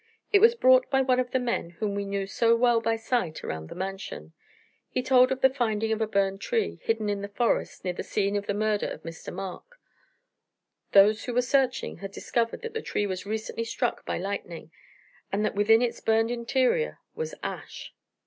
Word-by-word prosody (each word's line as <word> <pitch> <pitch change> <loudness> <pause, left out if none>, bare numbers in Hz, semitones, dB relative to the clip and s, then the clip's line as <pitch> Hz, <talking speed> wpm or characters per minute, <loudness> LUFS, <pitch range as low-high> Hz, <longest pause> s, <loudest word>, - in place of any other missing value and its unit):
It 400 - +7
was 460 +2 +7
brought 255 - +5
by 270 -1 +3
one 255 -1 +2
of 250 -1 0
the 260 - +1
men 240 -8 -1
whom 205 +1 -1
we 200 0 -2
knew 200 0 -2
so 230 +4 +3
well 235 -1 +3
by 225 0 +1
sight 225 -7 -2
around 80 0 -5
the - - -8
Mansion. 190 - -6 0.6
He 255 - -2
told 255 0 +5
of 265 0 -2
the 265 - +6
finding 225 -4 0
of 220 0 0
a 220 - +1
burned 195 -1 0
tree, 465 -3 -1
hidden 225 -1 -1
in 205 -1 -1
the 200 - -4
forest, 230 +4 -1
near 180 - -1
the - - -5
scene 200 -1 -1
of 205 0 -2
the 200 - -1
murder 215 0 0
of - - -7
Mr. 165 -1 -8
Mark. 195 - -8 1.1
Those 210 +2 +6
who 245 - -4
were 250 - +3
searching 260 0 +1
had 195 0 -7
discovered 230 - -2
that 460 - -5
the 450 - -3
tree 205 - -1
was 185 0 -4
recently 220 +1 -3
struck 230 +1 -2
by - - -3
lightning 175 -4 -5 0.6
and 210 +2 0
that - - -1
within 225 +3 +4
its 240 - -2
burned 225 +1 +2
interior 260 - +1 0.2
was 475 0 -5
ash. - - -6
225 Hz, 205 wpm, -27 LUFS, 200-250 Hz, 1.1 s, It